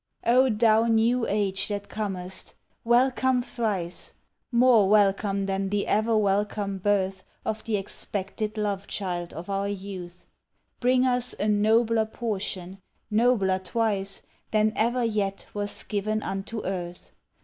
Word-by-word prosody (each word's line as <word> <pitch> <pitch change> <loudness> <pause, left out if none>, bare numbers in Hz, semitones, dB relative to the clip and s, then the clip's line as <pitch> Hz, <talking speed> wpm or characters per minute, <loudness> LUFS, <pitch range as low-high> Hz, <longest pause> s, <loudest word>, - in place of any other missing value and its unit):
O 255 +3 +5
thou 220 0 +4
New 230 +2 +2
Age 200 -2 0
that 205 -1 -4
comest! 190 -3 -5 0.3
welcome 250 +1 +3
thrice 210 -8 -3 0.4
More 235 -5 +5
welcome 200 -1 +3
than 195 0 -1
the 205 0 0
ever 220 +2 +2
welcome 200 -1 0
birth 190 -1 0 0.2
Of 220 0 -2
the 220 -2 0
expected 200 +2 -4
love 200 -2 -2
child 175 -3 -3
of 165 +3 -8
our 200 0 -1
youth! 185 -3 -7 0.5
Bring 255 +1 +3
us 250 -1 +1
a 210 - 0
nobler 220 +2 +3
portion 195 -5 -4 0.3
nobler 210 -4 +3
twice 195 0 -2 0.3
Than 215 0 +2
ever 240 +3 +1
yet 205 -3 -1
was 205 0 -3
given 215 +1 -2
unto 195 +3 -4
earth! 180 -2 -5
210 Hz, 125 wpm, -26 LUFS, 195-225 Hz, 0.5 s, O